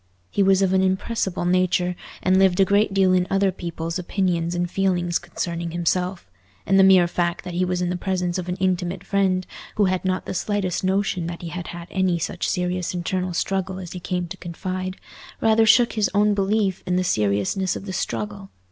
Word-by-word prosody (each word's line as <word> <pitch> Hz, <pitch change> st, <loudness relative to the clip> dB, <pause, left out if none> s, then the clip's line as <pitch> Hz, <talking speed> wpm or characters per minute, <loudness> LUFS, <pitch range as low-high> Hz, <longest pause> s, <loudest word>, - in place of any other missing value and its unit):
He -, -, +1 dB
was 195 Hz, 0 st, +4 dB
of 190 Hz, -1 st, +2 dB
an 190 Hz, -, +4 dB
impressible 190 Hz, -1 st, -1 dB
nature, 180 Hz, 0 st, +2 dB, 0.3 s
and 185 Hz, +1 st, +4 dB
lived 190 Hz, -1 st, +3 dB
a 195 Hz, -, +6 dB
great 200 Hz, +2 st, +2 dB
deal 190 Hz, -1 st, +3 dB
in 180 Hz, 0 st, +2 dB
other 195 Hz, 0 st, +2 dB
people's 170 Hz, -1 st, -4 dB
opinions 175 Hz, -2 st, -1 dB
and 175 Hz, 0 st, 0 dB
feelings 175 Hz, -2 st, 0 dB
concerning 170 Hz, 0 st, -4 dB
himself; 175 Hz, -, -1 dB, 0.4 s
and 195 Hz, 0 st, +4 dB
the -, -, +7 dB
mere 190 Hz, -2 st, +7 dB
fact 170 Hz, 0 st, -1 dB
that 180 Hz, -, -6 dB
he 180 Hz, +2 st, +1 dB
was 180 Hz, 0 st, -1 dB
in 175 Hz, -, -1 dB
the -, -, -1 dB
presence 180 Hz, -1 st, -1 dB
of 180 Hz, 0 st, -5 dB
an 180 Hz, -, -1 dB
intimate 185 Hz, -1 st, -1 dB
friend, 190 Hz, -2 st, +1 dB, 0.3 s
who 210 Hz, -, +3 dB
had 185 Hz, -1 st, 0 dB
not 185 Hz, 0 st, -1 dB
the -, -, -4 dB
slightest 190 Hz, -2 st, -1 dB
notion 190 Hz, -2 st, 0 dB
that 170 Hz, 0 st, -6 dB
he 170 Hz, -, -4 dB
had 175 Hz, +1 st, -6 dB
had 170 Hz, 0 st, -8 dB
any 185 Hz, -2 st, +1 dB
such 170 Hz, +1 st, -2 dB
serious 180 Hz, 0 st, -1 dB
internal 180 Hz, 0 st, -2 dB
struggle 190 Hz, 0 st, -1 dB
as 180 Hz, -3 st, -7 dB
he 180 Hz, -, -6 dB
came 180 Hz, 0 st, -2 dB
to 190 Hz, -, -7 dB
confide, 185 Hz, +2 st, -5 dB, 0.4 s
rather 225 Hz, 0 st, +4 dB
shook 235 Hz, +2 st, +5 dB
his 215 Hz, -3 st, +1 dB
own 210 Hz, 0 st, +4 dB
belief 200 Hz, -1 st, 0 dB
in 180 Hz, -, +1 dB
the 185 Hz, -, +2 dB
seriousness 105 Hz, -, 0 dB
of -, -, -7 dB
the 190 Hz, -, -5 dB
struggle. 105 Hz, -, -4 dB
185 Hz, 205 wpm, -23 LUFS, 175-190 Hz, 0.4 s, the